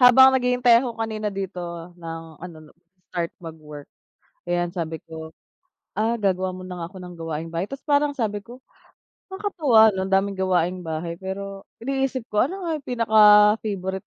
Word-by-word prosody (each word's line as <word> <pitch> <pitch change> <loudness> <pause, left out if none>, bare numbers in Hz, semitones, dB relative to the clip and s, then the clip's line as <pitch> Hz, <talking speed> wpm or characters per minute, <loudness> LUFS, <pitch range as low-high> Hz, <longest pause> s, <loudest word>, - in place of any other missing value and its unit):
habang 260 +1 +8
naghihintay 250 -2 +4
ako 240 -3 -4
kanina 220 -2 -2
dito 195 -2 -5 0.4
ng 165 -1 -6 0.2
ano 175 -2 -9
'no, 150 - -18 0.4
start 170 -2 -1
mag-work, 150 -3 -9 0.7
ayan, 175 0 +1
sabi 165 -2 -3
ko, 160 0 -8 0.7
"Ah, 225 +2 +2
gagawa 185 -4 0
muna 185 -1 -8
nga 165 - -4
ako 190 +3 -14
ng 180 0 -9
gawaing 165 0 -4
bahay." 170 +3 -2
Tapos 275 +4 -8
parang 290 -1 +2
sabi 215 -6 -1
ko, 245 +2 -12 0.7
"Nakakatuwa, 300 - +4
'no, 190 -1 -2
ang 195 - -7
daming 195 0 +1
gawaing 185 -1 +1
bahay." 165 +1 -4
Pero 195 +1 -6 0.2
iniisip 270 0 -1
ko 210 +3 +3
ano 380 +6 -7
nga 330 -3 -2
yung 280 - -18
pinaka-favorite 210 -4 +4
195 Hz, 160 wpm, -23 LUFS, 175-240 Hz, 0.7 s, habang